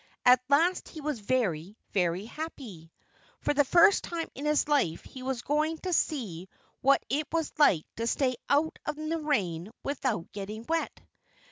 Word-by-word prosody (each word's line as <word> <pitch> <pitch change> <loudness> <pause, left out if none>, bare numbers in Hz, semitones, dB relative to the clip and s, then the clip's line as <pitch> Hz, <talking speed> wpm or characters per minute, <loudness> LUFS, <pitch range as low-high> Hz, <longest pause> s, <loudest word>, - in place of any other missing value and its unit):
At 250 0 +7
last 335 +6 +3
he 315 - -9
was 295 -4 -3
very, 200 -5 -1
very 180 0 0
happy. 230 - -8 0.5
For - - 0
the 290 0 +4
first 345 +8 +5
time 335 -1 -3
in 280 - -6
his 300 -1 +2
life 275 - +1
he 260 - -11
was 255 -2 -3
going 305 +3 0
to 365 -1 -1
see 195 - -1 0.3
what 275 +1 +4
it 295 +2 -1
was 325 -1 -1
like 185 - +5
to 230 +1 -1
stay 255 0 +1
out 295 +3 +2
in 310 +1 -4
the 330 0 0
rain 195 - -1
without 260 -10 -2
getting 210 +3 -6
wet. 330 0 -2
270 Hz, 165 wpm, -29 LUFS, 205-305 Hz, 0.5 s, At